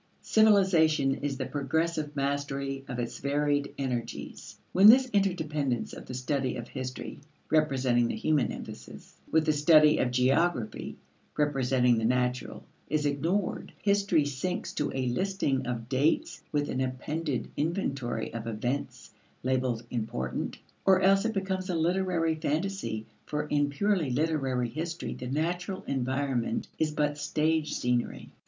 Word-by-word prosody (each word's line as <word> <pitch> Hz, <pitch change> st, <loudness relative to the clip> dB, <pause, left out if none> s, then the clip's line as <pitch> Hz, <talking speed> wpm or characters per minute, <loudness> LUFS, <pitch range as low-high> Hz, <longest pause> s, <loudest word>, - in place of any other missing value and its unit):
Civilization 185 Hz, -10 st, +4 dB
is 140 Hz, -1 st, -3 dB
the -, -, -2 dB
progressive 150 Hz, +1 st, -1 dB
mastery 140 Hz, -1 st, -2 dB
of 125 Hz, -, -5 dB
its 120 Hz, -1 st, -4 dB
varied 145 Hz, 0 st, 0 dB
energies. 125 Hz, -4 st, -4 dB
When 195 Hz, +3 st, +7 dB
this 255 Hz, +4 st, +8 dB
interdependence 155 Hz, -, 0 dB
of -, -, -9 dB
the 130 Hz, -, -6 dB
study 130 Hz, +1 st, -1 dB
of 120 Hz, -, -6 dB
history, 130 Hz, -1 st, -6 dB, 0.3 s
representing 130 Hz, -6 st, +3 dB
the -, -, -2 dB
human 150 Hz, -5 st, +1 dB
emphasis, -, -, -9 dB, 0.2 s
with 160 Hz, -1 st, +3 dB
the 155 Hz, -, +3 dB
study 150 Hz, 0 st, +6 dB
of 125 Hz, -, +2 dB
geography, 125 Hz, -1 st, +1 dB, 0.4 s
representing 130 Hz, -4 st, +2 dB
the 110 Hz, -, -1 dB
natural, 125 Hz, +1 st, 0 dB, 0.3 s
is 150 Hz, 0 st, 0 dB
ignored, 165 Hz, +7 st, -1 dB
history 200 Hz, -6 st, +2 dB
sinks 145 Hz, +6 st, -3 dB
to -, -, -1 dB
a 130 Hz, -1 st, -2 dB
listing 135 Hz, -2 st, 0 dB
of 115 Hz, -2 st, -3 dB
dates 150 Hz, +4 st, +1 dB
with 145 Hz, -1 st, 0 dB
an 130 Hz, -, -1 dB
appended 130 Hz, +2 st, -3 dB
inventory 140 Hz, -, -2 dB
of 115 Hz, 0 st, -5 dB
events, 120 Hz, +5 st, -3 dB, 0.3 s
labeled 125 Hz, -2 st, 0 dB
"important"; 85 Hz, -, -3 dB, 0.3 s
or 190 Hz, -1 st, +5 dB
else 195 Hz, +2 st, +4 dB
it 225 Hz, -, 0 dB
becomes 190 Hz, -2 st, -2 dB
a 180 Hz, -, 0 dB
literary 170 Hz, 0 st, +1 dB
phantasy 160 Hz, -, -2 dB, 0.2 s
for 150 Hz, 0 st, -1 dB
in 145 Hz, -1 st, +1 dB
purely 185 Hz, 0 st, +1 dB
literary 135 Hz, -3 st, 0 dB
history 165 Hz, +5 st, -4 dB
the 125 Hz, -, -7 dB
natural 175 Hz, +7 st, -2 dB
environment 130 Hz, -1 st, -1 dB
is 160 Hz, -, +2 dB
but 150 Hz, -1 st, -1 dB
stage 155 Hz, +1 st, 0 dB
scenery. 125 Hz, -1 st, -1 dB
145 Hz, 135 wpm, -29 LUFS, 130-165 Hz, 0.4 s, this